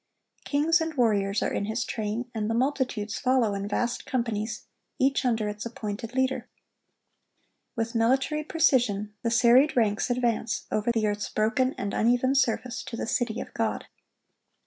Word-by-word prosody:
Kings 320 +4 +2
and 320 -1 -3
warriors 205 -5 +2
are - - -1
in 200 - -1
his 220 +3 -2
train, 220 +2 -3
and 215 -2 -2
the 225 - 0
multitudes 250 -5 -1
follow 255 -5 +2
in 200 0 -3
vast 235 +3 -1
companies, 225 -4 -2 0.3
each 270 +1 +2
under 225 -4 +1
its 210 0 -5
appointed 230 0 -6
leader. 260 0 0 1.3
With 230 0 -2
military 265 +6 +1
precision, 245 -11 +1
the 230 - 0
serried 245 +5 +5
ranks 210 0 +2
advance 240 -2 0
over 215 +3 +1
the 225 -2 0
earth's 210 0 -1
broken 250 +5 +1
and 200 - -3
uneven 245 +3 +2
surface 250 -2 0
to 230 - -6
the - - -2
city 235 0 -1
of - - -7
God. - - -1
235 Hz, 155 wpm, -27 LUFS, 215-260 Hz, 1.3 s, serried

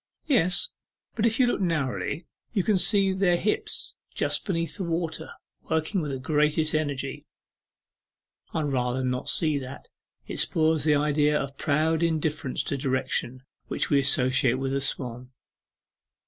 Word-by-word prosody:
'Yes, 245 - +3 0.4
but 225 0 +2
if 225 +2 0
you 255 - +6
look 240 - 0
narrowly 165 -1 -1 0.3
you 200 -5 +1
can 215 - +2
see 195 0 +4
their 190 -2 +3
hips 415 - -1 0.2
just - - 0
beneath 165 -5 -2
the - - -3
water, 165 -1 -2 0.4
working 160 +4 0
with 150 - -3
the 135 - -3
greatest 150 +3 +2
energy.' 145 -3 -2 1.2
'I'd 160 -2 -1
rather 125 0 0
not 125 0 -1
see 155 -3 +2
that, 130 +1 -9 0.4
it - - -5
spoils 160 -2 +2
the 150 -1 +4
idea 150 0 +2
of 135 0 -5
proud 155 +3 +1
indifference 155 -4 0
to 140 - -1
direction 130 -1 -1 0.2
which 140 - -2
we 140 - +5
associate 130 -2 +2
with 135 0 -2
a 140 - 0
swan. 125 -2 -4
150 Hz, 145 wpm, -26 LUFS, 135-170 Hz, 1.2 s, you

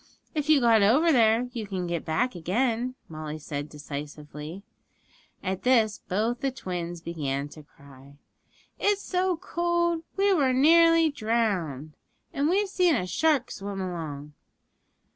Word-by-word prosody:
'If 305 -2 -2
you 310 -2 +6
got 230 -3 +4
over 270 +12 +4
there 230 -2 +4
you 220 -3 -5
can 190 -2 -3
get 170 -2 -3
back 170 +11 0
again,' 235 +8 -1
Molly 155 -1 -6
said 145 -1 -5
decisively. 150 +3 -8 0.8
At 190 -1 -2
this 225 -5 +3
both 225 +6 -1
the 275 - +1
twins 175 -8 -5
began 145 -5 -3
to 155 - -12
cry. 140 -1 -17 0.6
'It's 410 0 +1
so 365 -1 0
cold; 345 -1 0 0.2
we 395 0 +3
was 270 -7 +2
nearly 330 +3 +5
drownded; 195 - -1 0.4
and 285 +2 +1
we've 400 +3 +2
seen 360 -4 +2
a 180 - -1
shark 275 - +1
swim 200 0 -6
along.' 155 -6 -5
215 Hz, 140 wpm, -27 LUFS, -, 0.8 s, you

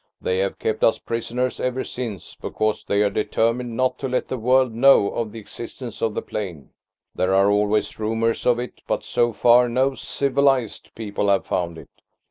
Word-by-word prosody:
They 90 0 -1
have 95 0 -1
kept 110 -1 -2
us 115 - +4
prisoners 120 +2 -3
ever 125 +1 -1
since, 115 -8 -6
because 110 -1 -2
they 100 +1 +1
are 100 - +2
determined 115 +3 0
not 130 0 +1
to 135 - -2
let 125 0 -1
the 130 - -2
world 130 +1 +3
know 120 -3 +5
of 115 -2 -3
the 115 - -9
existence 115 +2 -8
of 110 -2 0
the - - -2
plain. 90 -9 -6 0.4
There 95 +1 +1
are 100 +1 +4
always 105 +1 +1
rumours 115 +1 0
of 120 -1 +4
it, 125 +1 -6
but - - -1
so 120 0 +1
far 120 +2 +5
no 130 +3 +1
'civilised' 135 -4 0
people 105 -2 -2
have 100 -1 +2
found 85 -2 -2
it. - - -13
115 Hz, 185 wpm, -22 LUFS, 105-125 Hz, 0.4 s, know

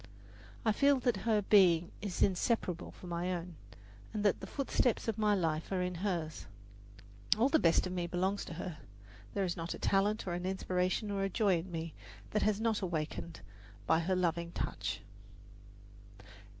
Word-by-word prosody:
I 220 - +5
feel 280 +5 +4
that 245 -2 +2
her 210 -2 +3
being 175 -5 +5
is 200 -4 0
inseparable 185 -2 0
from 180 - -11
my 175 +1 -1
own, 175 0 -6 0.6
and 210 -1 -2
that 205 - +3
the - - -7
footsteps 255 -5 0
of 220 -1 -1
my 210 -1 +4
life 160 -3 -1
are 185 -2 +1
in 180 0 -2
hers. 170 -4 -3 0.9
All 240 +5 +4
the 315 - +4
best 165 - +4
of 185 - -4
me 175 -1 -1
belongs 185 +3 0
to 165 - -7
her 170 -2 -5 0.6
there 200 - +1
is 175 - -2
not 170 0 -4
a - - -8
talent, 205 +2 +1
or 180 - -2
an 180 +1 -2
aspiration 185 +2 0
or 200 -1 -1
a 195 - 0
joy 195 -3 +2
in 180 +2 -8
me 165 -1 -4 0.4
that 210 - +1
has 215 -1 +2
not 225 -1 +1
been 195 - -2
awakened 160 - -4 0.4
by 160 - +4
her 180 +3 0
loving 170 -1 0
touch. 105 -1 -3
185 Hz, 180 wpm, -33 LUFS, 170-210 Hz, 0.9 s, I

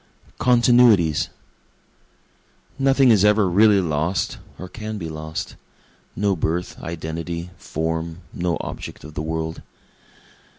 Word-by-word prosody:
Continuities 120 -9 +4 1.5
Nothing 135 -1 +5
is 105 -3 +5
ever 105 -1 +4
really 100 +3 +5
lost, 80 +1 -1 0.2
or 90 - -7
can 110 +2 -6
be 85 -5 -5
lost, 80 0 -6 0.6
No 100 0 +1
birth, 85 +2 -2
identity, 85 +1 -5
form 80 +2 -3
no 85 -1 -1
object - - -7
of 80 - -10
the 75 - -4
world. 80 0 -3
85 Hz, 110 wpm, -22 LUFS, 80-105 Hz, 1.5 s, Nothing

